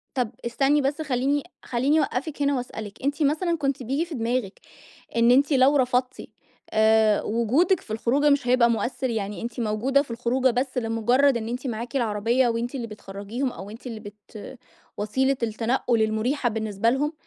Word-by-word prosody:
طب 245 -4 0 0.2
استني 275 +5 +2
بس، 285 +3 -1
خلّيني 275 0 0 0.2
خلّيني 265 +6 +1
أوقفِك 290 +1 -2
هنا 280 0 +2
وأسألِك، 220 -4 -7
أنتِ 285 +2 0
مثلًا 330 +4 +1
كنتِ 275 -3 -1
بييجي 275 +7 -1
في 335 -3 -8
دماغِك 230 -3 -2 0.6
إن 235 +1 +4
أنتِ 280 +4 +4
لو 270 +2 +5
رفضتِ، 250 -1 +1 0.5
آآ 220 -1 +4
وجودِك 255 - +2
في 215 - -9
الخروجة 270 +7 +2
مش 280 -3 +2
هيبقى 245 -1 +4
مؤثّر؟ 250 +3 -1
يعني 210 -3 -3
أنتِ 235 +1 -5
موجودة 235 +6 +1
في 275 - -17
الخروجة 245 +2 +1
بس 255 +2 -2
لمجرّد 240 +4 +2
إن 225 -1 -3
أنتِ 250 +3 -4
معاكِ 235 +2 -4
العربية 235 +1 +1
وأنتِ 235 +2 -2
اللي 240 -4 -3
بتخرجيهم، 210 +5 -5
أو 195 - -9
وأنتِ 225 +5 -11
اللي 225 -3 -6
بت 210 +3 -11 0.4
وسيلة 265 +6 0
التنقل 230 +1 0
المريحة 230 +5 0
بالنسبة 220 -1 0
لهم؟ 290 +4 0
245 Hz, 165 wpm, -24 LUFS, 225-275 Hz, 0.6 s, لو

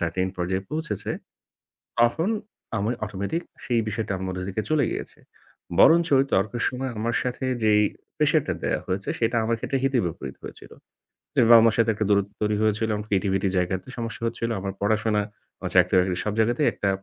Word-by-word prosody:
certain 90 +2 0
পর্যায়ে 95 +2 -1
পৌঁছেছে, 160 +2 -3 0.9
তখন 140 +10 +3 0.5
আমি 105 +3 0
automatic 100 - -3 0.2
সেই 120 -2 +1
বিষয়টা 105 -1 -2
আমার 95 0 -4
মধ্যে 90 0 -4
থেকে 100 +3 -2
চলে 155 -2 +3
গিয়েছে। - - -6 0.6
বরঞ্চ 170 +1 +6
ওই 135 - +4
তর্কের 110 +4 +1
সময় 130 +1 -4
আমার 115 +2 -1
সাথে 125 +1 -3 0.2
যেই 105 -1 +5 0.3
pressure - - +3
টা - - -1
দেয়া - - 0
হয়েছে, 95 +2 -3
সেটা 115 +1 +1
আমার 115 +1 +1
ক্ষেত্রে 135 - -1
হিতে 135 -1 +2
বিপরীত 80 -6 -6
হয়েছিল। - - -11 0.6
যে - - +5
বাবা-মার 115 -1 +7
সাথে 115 -1 +3
একটা 105 +1 -2
দূরত্ব 100 -1 +2
তৈরি 105 0 +1
হয়েছিল, 110 +1 +1
এবং 105 0 -3
পৃথিবীতে 95 0 +1
জায়গাতে 90 +4 -1
সমস্যা 115 -1 -5
হচ্ছিল, 115 0 -3
আমার 95 0 -4
পড়াশোনা, 105 0 +1 0.4
আমার - - -4
চাকরি-বাকরি 90 -1 +4
সব 105 - -1
জায়গাতেই 120 +6 +2
একটা, 100 - -1
105 Hz, 175 wpm, -25 LUFS, 95-120 Hz, 0.9 s, বাবা-মার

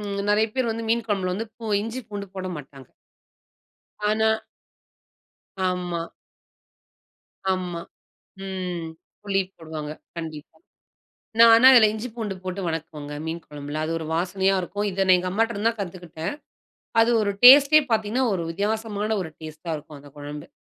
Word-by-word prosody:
ம் 200 -1 -3
நெறைய 210 +1 +4
பேர் 255 -3 0
வந்து 225 0 -4
மீன் 235 0 +1
கொழம்புல 190 -4 0
வந்து 225 +3 -3
பூ 235 - -11 0.2
இஞ்சி 230 +4 -4
பூண்டு 205 -1 -5
போடமாட்டாங்க. 150 -8 -7 1.2
ஆனா 220 +1 +3 1.4
ஆமா. 180 -2 -2 1.5
ஆமா. 180 -2 -3 0.7
ம். 180 -3 -4 0.4
புளி 195 -1 +1 0.2
போடுவாங்க 155 -2 -6 0.3
கண்டிப்பா. 155 -3 -7 0.8
நான் 230 0 +9
ஆனா 230 +3 +8
அதுல 230 -4 +8
இஞ்சி 220 +3 -5
பூண்டு 215 -5 -3
போட்டு 185 +1 -4
வணக்குவங்க, 155 -3 -5
மீன் 165 +1 -4
கொழம்புல. 145 +1 -6
அது 160 - -3
ஒரு 160 - -5
வாசனையா 190 +3 +1
இருக்கும். 205 +3 -3
இத 195 +1 0
நான் 185 - +7
எங்க 180 +1 -2
அம்மாட்டருந்து 225 +1 +1
தான் 230 - -5
கத்துக்கிட்டேன். 175 -3 -5 0.7
அது 225 - +4
ஒரு 205 -1 +1
டேஸ்ட்டே 280 +4 +10
பார்த்தீங்கன்னா, 220 +4 +1
ஒரு 185 - -1
வித்தியாசமான 210 +3 -1
ஒரு 170 - -5
டேஸ்ட்டா 155 +1 -7
இருக்கும் 150 0 -12
அந்த 145 0 -15
கொழம்பு. 145 0 -7
190 Hz, 140 wpm, -24 LUFS, 165-220 Hz, 1.5 s, டேஸ்ட்டே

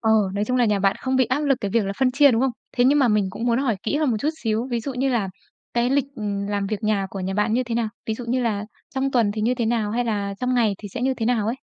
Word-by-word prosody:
Ờ, 220 - +1 0.2
nói 205 - 0
chung 250 +3 0
là 245 - +4
nhà 210 -2 +2
bạn 195 0 +2
không 260 0 0
bị 260 - +4
áp 255 +5 0
lực 280 -3 +2
cái 200 - -2
việc 230 -1 +2
là 195 - -2
phân 260 -1 +3
chia, 285 +1 +6
đúng 225 0 +2
không? 265 - +2 0.3
Thế 245 - +4
nhưng 285 +3 +5
mà 265 - +4
mình 210 -3 +2
cũng 230 - -5
muốn 235 0 +2
hỏi 255 -6 +1
kỹ 295 - 0
hơn 300 -4 +1
một 220 - +1
chút 300 - 0
xíu, 225 +2 0
ví 235 -1 0
dụ 270 +3 -5
như 260 +2 0
là 230 -7 0 0.5
cái 240 +1 +2
lịch, 275 -1 +2
ừm, 200 -2 -3
làm 200 -1 -1
việc 215 +2 -3
nhà 210 -2 +1
của 195 - -5
nhà 190 +1 -3
bạn 210 +2 +1
như 255 +2 +1
thế 235 -1 -4
nào? 230 -2 0 0.2
Ví 220 - -1
dụ 240 +2 -7
như 250 +2 0
là 210 -3 -1 0.3
trong 270 +1 0
tuần 230 -5 +2
thì 215 0 -3
như 245 +3 +2
thế 235 -3 -1
nào? 220 -3 0
Hay 240 +2 0
là 200 -3 -2
trong 250 0 0
ngày 220 -5 +2
thì 205 - -8
sẽ 245 +5 -5
như 265 0 +1
thế 225 -2 -2
nào 225 -4 +1
ấy? 230 - 0
230 Hz, 335 wpm, -23 LUFS, 210-255 Hz, 0.5 s, chia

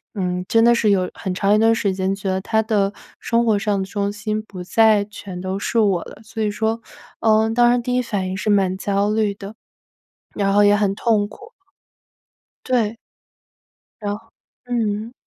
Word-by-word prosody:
嗯， 180 -2 -2
真 225 - +4
的 235 0 +5
是 220 -3 +2
有 185 -2 +1
很 190 -3 -4
长 200 +2 +2
一 - - +4
段 225 0 +4
时 205 -4 0
间 190 0 0
觉 195 -1 -4
得 190 0 -1
他 220 +2 +1
的 205 -3 +1 0.3
生 235 0 +1
活 215 -2 +3
上 205 -1 0
的 190 - -2
重 200 0 -2
心 215 +1 -3
不 185 -4 -9
再 215 +1 +4
全 195 -3 -9
都 185 +1 -3
是 230 - 0
我 195 -6 +2
了。 - - -12
所 220 +1 -4
以 210 - 0
说， 225 +2 -1 0.4
嗯， 220 0 +3
当 240 0 +5
时 245 - +2
第 250 +1 -2
一 250 - +2
反 200 -6 -3
应 185 - -3
是 210 - -2
蛮 190 -2 +2
焦 200 +1 0
虑 215 -2 +1
的， 200 +2 -9 0.8
然 195 -1 +1
后 205 0 +5
也 205 0 +5
很 200 -2 +1
痛 215 -3 +1
苦。 440 - -14 1.1
对。 230 -3 0 1.1
然 205 0 -1
后 225 +1 -18 0.4
嗯。 225 -2 -2
210 Hz, 210 characters per minute, -21 LUFS, 195-225 Hz, 1.1 s, 的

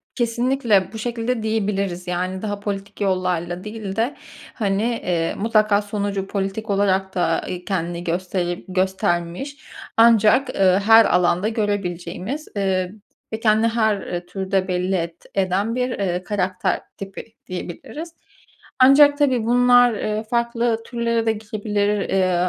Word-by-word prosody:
Kesinlikle 235 -5 +1
bu 220 - -6
şekilde 235 +1 -2
diyebiliriz. 200 -4 -1
Yani, 185 +1 -2
daha 205 -2 -3
politik 200 0 -5
yollarla 180 -2 -1
değil 210 -2 -6
de, 235 +5 0 0.4
hani, 200 -2 0
eee, 180 -8 -1
mutlaka 215 -1 +3
sonucu 200 -1 -3
politik 200 +2 -3
olarak 190 -1 +1
da, 180 - 0
eee, 180 0 -5
kendini 175 -2 -3
gösterip 175 0 -2
göstermiş 185 +6 -1 0.4
ancak, 230 +3 +5
eee, 190 0 +4
her 225 0 +8
alanda 180 +2 +2
görebileceğimiz, 205 - -3
ııı, 190 -2 0 0.4
ve 220 - -3
kendini 220 0 +3
her, 220 -3 +1
eee, 175 -1 -5
türde 190 +1 -1
belli 180 +1 0
et 170 -1 -5
eden 195 +3 0
bir, 250 0 -1
eee, 185 -6 -2
karakter 185 -1 -1 0.2
tipi 195 -1 -7 0.2
diyebiliriz. 195 - -7 0.7
Ancak, 285 +2 +7
tabii, 260 -6 +2
bunlar, 245 +1 +5
eee, 215 0 -2
farklı 235 -1 +1
türlere 235 -1 -1
de 225 - +3
gidebilir. 210 -1 -2 0.2
Eee, 185 -2 +2
200 Hz, 130 wpm, -21 LUFS, 185-225 Hz, 0.7 s, her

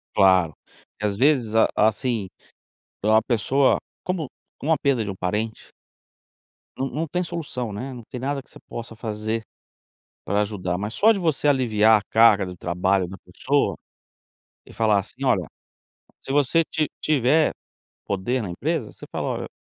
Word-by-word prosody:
Claro, 95 -5 +5 0.5
às 105 -1 0
vezes, 125 -5 +3
a 115 - +6
assim, 110 -1 +1 0.7
para 110 +1 +4
a - - +1
pessoa 130 +4 +2 0.3
como 180 -5 -2 0.3
como 160 - 0
a 160 - +4
perda 135 -5 +2
de 100 - -4
um 95 - -5
parente 105 +5 -3 1.1
não 135 +1 -2
não 160 +3 -3
tem 180 +4 -1
solução, 145 -9 -4
né, 125 +7 -5
não 120 -2 -9
tem 125 - -8
nada 140 +2 -2
que - - -26
você - - -14
possa 115 -1 -7
fazer, 110 0 -3 0.8
para 100 +2 +1
ajudar, 95 -4 -2
mas 105 +2 -4
só 220 - +5
de 200 - -2
você 160 -4 +1
aliviar 110 -5 +4
a - - -8
carga 110 -3 +6
do 90 -1 -8
trabalho 90 +2 0
da 95 - -8
pessoa, 130 +12 0 0.9
e - - -15
falar 110 -3 +3
assim: 125 +7 -7
"Olha", 95 -9 +2 0.8
se - - -10
você 145 +4 +3
ti 155 -1 -1
tiver 150 +1 +3 0.5
poder 110 +6 -1
na 100 - -4
empresa, 85 - -2
você - - -12
fala; - - -2
"Olha" - - -3
115 Hz, 165 wpm, -24 LUFS, 105-140 Hz, 1.1 s, a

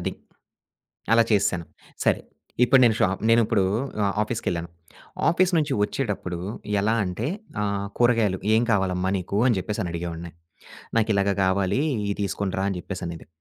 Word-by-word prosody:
అది. - - -2 1.0
అలా 115 0 +6
చేసేసాను. 90 -4 +2 0.4
సరే. - - +3 0.4
ఇప్పుడు 130 +1 +6
నేను 115 - +4
షాప్ 95 +1 +1
నేనిప్పుడు 115 -3 +4 0.4
ఆహ్, 100 - 0
ఆఫీస్‌కె‌ళ్ళాను. 90 -7 -3 0.6
ఆఫీస్ 180 +2 +3
నుంచి 150 - 0
వచ్చేడప్పుడు 105 -6 -2 0.4
ఎలా 110 +3 +2
అంటే, 90 +6 -3 0.4
ఆహ్, 100 -1 -1
కూరగాయలు 115 -6 +3 0.2
ఏం 115 - +4
కావాలమ్మా 95 -2 +1
నీకు 95 +3 -3
అని 120 -5 +3
చెప్పేసని 95 -2 -3
అడిగేవాడిని. 85 0 -5 0.7
"నాకిలాగ 100 -2 +2
కావాలి 95 +6 +1 0.3
ఇది - - 0
తీసుకునిరా" 95 -1 -2
అని 90 - -3
చెప్పేసనేది. 85 -4 -6
100 Hz, 130 wpm, -24 LUFS, 90-115 Hz, 1.0 s, అలా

